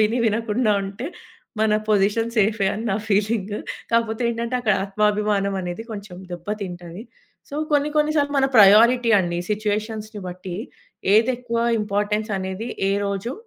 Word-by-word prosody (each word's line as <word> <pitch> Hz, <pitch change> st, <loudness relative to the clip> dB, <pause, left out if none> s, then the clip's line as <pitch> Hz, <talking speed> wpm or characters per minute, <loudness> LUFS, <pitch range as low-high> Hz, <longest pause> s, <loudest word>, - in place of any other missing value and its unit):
విని, 220 Hz, +3 st, +2 dB
వినకుండా 220 Hz, +1 st, +1 dB
ఉంటే 200 Hz, +8 st, -6 dB, 0.5 s
మన 220 Hz, -1 st, +3 dB, 0.2 s
పొజిషన్ 210 Hz, +2 st, +2 dB
సేఫే 210 Hz, -1 st, +2 dB
అని 220 Hz, +2 st, -5 dB
నా 195 Hz, -, +1 dB
ఫీలింగ్. 210 Hz, 0 st, 0 dB, 0.4 s
కాపోతే 230 Hz, 0 st, +1 dB
ఏంటంటే, 235 Hz, +2 st, -3 dB
అక్కడ 215 Hz, -4 st, +2 dB
ఆత్మాభిమానమనేది 200 Hz, -1 st, 0 dB
కొంచెం 200 Hz, -3 st, -8 dB, 0.2 s
దెబ్బ 175 Hz, +1 st, -8 dB, 0.2 s
తింటది. 175 Hz, +1 st, -7 dB, 0.5 s
సో, 280 Hz, -, -7 dB, 0.2 s
కొన్ని 290 Hz, 0 st, +3 dB
కొన్ని 300 Hz, 0 st, +3 dB
సార్లు 285 Hz, -1 st, +1 dB
మన 270 Hz, -, +4 dB
ప్రయారిటీ 230 Hz, +4 st, +7 dB
అండి 175 Hz, -1 st, -2 dB
సిచ్యువేషన్స్‌ని 215 Hz, 0 st, -2 dB
బట్టి. 180 Hz, 0 st, -7 dB, 0.6 s
ఏదెక్కువా 235 Hz, +1 st, +1 dB, 0.2 s
ఇంపార్టెన్సనేది, 205 Hz, 0 st, -2 dB, 0.2 s
ఏ -, -, +2 dB
రోజు 200 Hz, +5 st, -3 dB
210 Hz, 130 wpm, -22 LUFS, 200-230 Hz, 0.6 s, ప్రయారిటీ